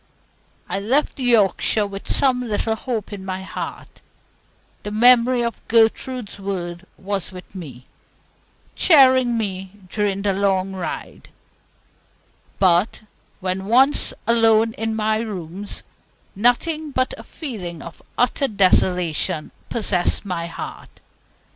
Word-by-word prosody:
I 195 - -2
left 260 +9 0
Yorkshire 220 -3 +3
with 200 -1 -8
some 255 -2 +3
little 225 -1 -1
hope 220 -3 -4
in 195 -2 -7
my 190 0 -5
heart - - -7 0.8
the - - -5
memory 240 +3 +5
of 235 -1 -3
Gertrude's 230 0 +1
words 180 -2 -5
was 195 -1 -3
with 185 -1 -12
me, 135 -10 -9 0.9
cheering 260 -6 +5
me 190 -3 -4 0.2
during 200 -1 -1
the 200 -1 +1
long 195 -1 0
ride; 185 -2 -6 1.3
but 185 +4 +2 0.4
when 185 +1 -2
once 265 +6 +4
alone 225 -1 +4
in 225 0 -3
my 215 0 +1
rooms, 200 -3 -6 0.5
nothing 300 +9 +1
but 255 -2 -1
a - - -11
feeling 190 - -7
of 170 - -11 0.2
utter 250 +3 +1
desolation 180 - +1 0.2
possessed 205 -4 0
my 170 -3 -3
heart. 165 - -9
205 Hz, 115 wpm, -21 LUFS, 190-235 Hz, 1.3 s, memory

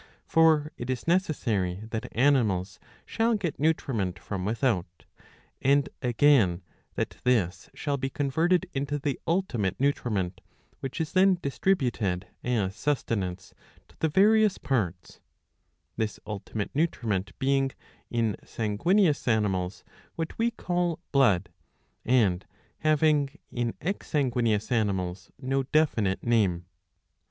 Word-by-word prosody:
For 160 -3 +4
it 120 - -6
is 130 +3 -3
necessary 110 - 0
that 110 - -4
animals 115 -8 +2 0.3
shall 225 +1 +1
get 180 -8 -3
nutriment 120 - 0
from 95 +1 -5
without; 105 - -1 0.6
and, 140 +1 +3
again, 120 -8 +3 0.3
that - - -3
this 110 -8 +1
shall 145 -2 -1
be 135 0 -2
con 140 0 -2
verted 170 +4 +2
into 140 +1 -1
the 145 -2 -2
ultimate 135 - 0
nutriment, 105 -10 0 0.4
which 135 +4 -5
is 160 -2 -2
then 190 0 +4
distributed 120 - 0 0.2
as 105 -6 0
sustenance 100 -11 -2 0.4
to - - -22
the 160 - +1
various 210 +4 +4
parts; 95 -10 -2 0.8
this 110 -2 -2
ultimate 105 0 -4
nutriment 110 - -1
being, 135 0 +2 0.4
in 115 -3 0
sanguineous 150 - +1
animals, 100 -5 0 0.3
what 165 -1 -4
we 230 +1 +3
caJl 175 -6 -1
blood, 105 -10 +3 0.5
and 105 -8 +2 0.3
having, 155 -1 +2
in 120 -1 -2
ex 195 +5 -3
sanguineous 120 -7 0
animals, 95 -5 -1
no 135 +1 0
definite 130 -9 +1
name. 100 -7 +2
125 Hz, 115 wpm, -27 LUFS, 100-150 Hz, 0.8 s, For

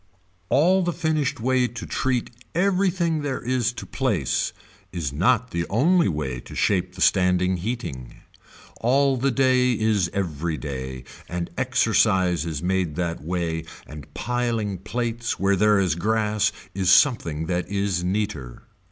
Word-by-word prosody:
All 180 +7 +4
the 175 -1 -1
finished 160 -7 -1
way 125 +1 +2
to 120 - -7
treat 130 -3 -1 0.2
everything 180 -3 +1
there 140 -3 -2
is 125 -1 0
to - - -7
place 110 - -1 0.4
is 80 -6 -3
not 120 - +2
the 85 0 -2
only 170 - +3
way 75 -7 -2
to - - -11
shape 90 -3 0
the 95 - -8
standing 90 -1 +3
heating. 90 - -5 0.6
All 135 +3 +2
the 130 +2 +1
day 130 -1 +3
is 105 -5 +1
every 85 -4 -2
day 65 -3 -6 0.3
and 85 0 -4
exercise 105 - +2
is 80 -1 -4
made 90 -4 0
that 85 -1 -2
way 85 0 -2 0.2
and 75 -1 -11
piling 115 -5 -1
plates 115 +3 -3
where 100 +1 +3
there 105 +2 +4
is 90 -5 +2
grass 105 +3 +1 0.2
is 95 -1 0
something 85 - +3
that 90 0 -2
is 100 -3 -1
neater. 90 - -3
100 Hz, 145 wpm, -24 LUFS, 85-125 Hz, 0.6 s, All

